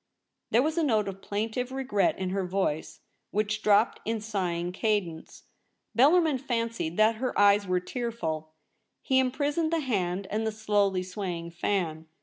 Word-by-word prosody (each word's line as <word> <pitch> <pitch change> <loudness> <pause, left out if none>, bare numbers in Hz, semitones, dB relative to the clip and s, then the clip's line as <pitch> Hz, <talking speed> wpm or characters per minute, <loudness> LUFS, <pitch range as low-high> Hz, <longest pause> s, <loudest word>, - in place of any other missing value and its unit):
There 235 +3 +4
was 315 +3 0
a - - +2
note 220 -8 +2
of 195 0 -6
plaintive 225 +5 -3
regret 260 -7 +1
in 185 -1 -2
her 195 0 -1
voice, 180 -4 -2 0.3
which 210 +1 -1
dropped 210 +2 +3
in 225 0 -1
sighing 180 -5 -2
cadence. 190 -5 -2 0.5
Bellarmin 300 +3 +4
fancied 230 -9 -2
that 215 +1 +4
her 255 +2 -2
eyes 205 0 +5
were 180 0 +2
tearful. 180 -8 -4 0.5
He 265 -2 +3
imprisoned 290 +5 0
the 330 -1 +1
hand 195 -7 -1
and 215 +2 0
the - - 0
slowly 205 -3 +1
swaying 180 -3 -5
fan. 170 -3 -2
210 Hz, 150 wpm, -28 LUFS, 185-245 Hz, 0.5 s, eyes